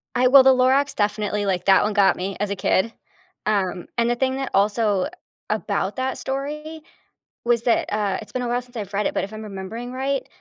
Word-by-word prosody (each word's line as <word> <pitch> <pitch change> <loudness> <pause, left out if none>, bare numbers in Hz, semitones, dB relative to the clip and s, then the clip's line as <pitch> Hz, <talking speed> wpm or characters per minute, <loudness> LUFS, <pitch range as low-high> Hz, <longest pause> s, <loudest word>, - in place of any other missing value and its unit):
I 250 +1 +4
well, 265 +1 +8
The 265 - +7
Lorax 260 +3 +2
definitely, 210 0 0
like, 180 -2 -1
that 195 -1 +5
one 210 - 0
got 200 -2 +4
me 190 +2 -3
as 205 -1 -1
a 200 - -2
kid, 195 +3 +1 0.5
um, 190 -4 -1
and 235 0 +2
the 240 - +2
thing 260 +1 0
that 270 -1 -3
also, 205 0 +2 0.4
about - - -1
that 260 0 -2
story 300 +4 -5 0.6
was 235 -1 +2
that, 235 - +1
uh, 205 -2 0
it's - - -12
been 255 - -3
a - - -2
while 245 +1 0
since 245 0 -13
I've 205 -2 -6
read 205 +1 +1
it, - - -3
but - - -1
if 200 +2 -6
I'm 215 0 -7
remembering 215 +4 -6
right, 270 +1 -2
225 Hz, 220 wpm, -23 LUFS, 200-260 Hz, 0.6 s, well